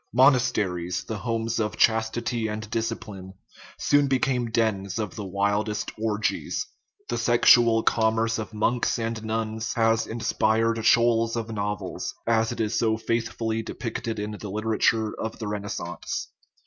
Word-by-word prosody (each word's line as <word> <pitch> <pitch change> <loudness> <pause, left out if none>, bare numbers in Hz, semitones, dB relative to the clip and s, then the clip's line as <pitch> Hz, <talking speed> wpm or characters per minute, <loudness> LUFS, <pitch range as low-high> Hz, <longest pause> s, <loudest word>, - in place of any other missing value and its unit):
Monasteries, 115 -9 +2
the 110 -2 -5
homes 115 +1 -1
of 110 -1 -1
chastity 110 +1 +1
and 105 0 -4
discipline, 100 -4 -4 0.4
soon 145 -1 +3
became 130 -3 +1
dens 110 -4 0
of 105 -4 -3
the 105 - -5
wildest 100 +2 -1
orgies; 110 - -1 0.4
the - - -2
sexual 120 -1 +5
commerce 115 0 +2
of 110 - -5
monks 115 +3 0
and 115 -1 -3
nuns 110 0 -2
has 115 -1 +2
inspired 115 0 +1
shoals 115 0 +4
of 115 -1 -3
novels, 105 -3 -3
as 115 0 +2
it 120 - -6
is 110 0 0
so 110 -1 +2
faithfully 115 0 -1
depicted 115 0 -4
in 105 +1 -3
the 105 -1 -7
literature 110 +1 +1
of 110 0 -4
the 110 - -5
Renaissance. 100 -4 -4
110 Hz, 135 wpm, -25 LUFS, 105-115 Hz, 0.4 s, sexual